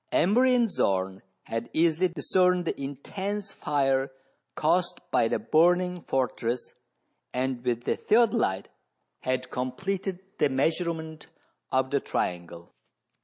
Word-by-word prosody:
Emery 250 +8 +4
and 240 -2 +3
Zorn 95 - 0 0.2
had 115 +1 -4
easily 165 +2 +3
discerned 180 +2 +2
the 150 - -3
intense 195 +9 -4
fire 135 -4 +1 0.5
caused - - +1
by - - +3
the - - 0
burning 180 +2 +3
fortress, 125 -3 -2 0.6
and 130 -1 -1
with 120 -1 -1
the - - 0
theodoHte 215 - +2 0.5
had 130 0 -2
com 125 0 -2
pleted 195 -1 -3 0.2
the 150 - +4
measurement 160 +3 -1 0.4
of 130 0 +1
the 140 - +2
triangle. 85 -5 -4
150 Hz, 120 wpm, -27 LUFS, 125-180 Hz, 0.6 s, Emery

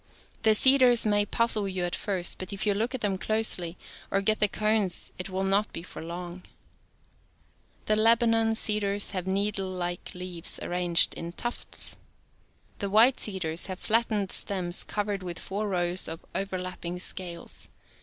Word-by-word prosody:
fThe 220 -1 +5
cedars 255 -3 +6
may 205 -1 +3
puz 230 +2 +3
zle 200 -2 -1
)uii 185 -1 -2
It 175 - -2
first, 185 -4 -1
but 185 +1 -5
if 200 +1 -3
you 205 - +3
look 230 +6 -1
at 255 - -5
tliLm 195 -2 -1
closely, 190 -6 0 0.3
or 195 - +1
get 215 +2 +2
the 210 - +5
cones 210 -2 0
it 180 - -4
will 190 0 -2
not 195 +2 +1
be 170 - -6
for - - -9
long. 175 +1 -6
g - - -18 1.4
LSAM - - -11
R. 215 - +4
^j^^ 215 - +3
Lebanon 225 -1 +4
cedars 205 -2 +2
have 185 -3 -3
nee 200 +2 +1
dlelike 185 -3 -4
leaves 180 -2 -4
arranged 175 -1 +3
in 170 0 -6
tufts. 240 +5 -5 0.8
The 200 - -2
white 230 +6 +5
cedars 180 -5 -3
have 185 -1 -5
flattened 215 -2 0
stems 180 -3 -1
covered 205 -2 -2
with 175 -2 -5
four 205 +2 -3
rows 175 -1 0
of 165 +1 -6
overlapping 185 -2 -3
scales. 180 -1 -5
195 Hz, 170 wpm, -28 LUFS, 180-215 Hz, 1.4 s, cedars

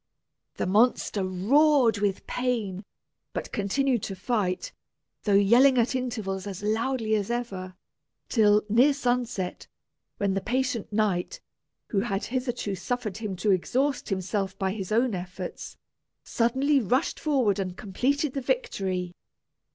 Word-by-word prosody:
The - - -2
monster 205 0 +2
roared 230 +5 +3
with 200 -2 -1
pain, 225 -7 -2 0.5
but - - -4
continued 240 +4 0
to 195 - -4
fight, 190 -2 -1 0.5
though 205 -2 +3
yelling 240 +7 +6
at 240 +2 +2
intervals 220 -7 -3
as 195 0 -6
loudly 225 +1 0
as 205 -1 0
ever, 195 -7 -4 0.5
till 210 -2 +4
near 245 +7 +5
sunset, 245 -8 -2 0.5
when 200 -1 0
the 195 - -1
patient 250 -2 -1
knight, 210 - 0 0.5
who 200 - +1
had 200 -2 -1
hitherto 245 -5 -2
suffered 215 +1 -3
him 215 -4 -4
to 190 +3 +1
exhaust 260 +9 0
himself 195 0 -2
by 190 -1 0
his 195 -2 -5
own 235 +2 +2
efforts, 180 0 -6 0.5
suddenly 265 +5 +2
rushed 255 - 0
forward 255 -10 +1
and 185 -1 -3
completed 265 +8 -1
the 275 - -2
victory! 190 - -2
215 Hz, 130 wpm, -27 LUFS, 195-250 Hz, 0.5 s, yelling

